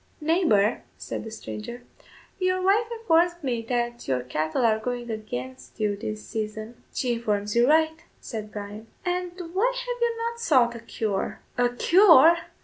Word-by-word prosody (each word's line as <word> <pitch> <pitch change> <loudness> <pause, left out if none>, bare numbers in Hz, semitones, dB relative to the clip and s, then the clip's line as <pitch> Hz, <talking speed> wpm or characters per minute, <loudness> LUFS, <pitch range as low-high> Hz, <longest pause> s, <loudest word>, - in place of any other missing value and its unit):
"Neighbour," 300 - +2 0.2
said - - -5
the 225 - -7
stranger, 220 - -7 0.6
"your 370 0 +1
wife 400 +5 +3
informs 350 -7 +2
me 245 -4 -1
that 240 -1 -2
your 130 -2 0
cattle 155 - -1
are 220 -1 +3
going 240 +1 -4
against 130 - -7
you 210 -1 +1
this 105 - -6
season." 220 +1 -5
"She 250 -3 -1
informs 210 -3 -2
you 240 +3 +4
right," 315 +1 +3 0.2
said 215 -2 -7
Bryan. 210 +1 -8 0.2
"And 360 0 -2 0.2
why 450 +7 +2
have - - -4
you 470 -1 +1
not 465 0 -3
sought 255 - +3
a 235 - -8
cure?" 215 -3 -3
"A 245 -1 +2
cure!" 330 +3 +6
240 Hz, 155 wpm, -25 LUFS, 215-345 Hz, 0.6 s, cure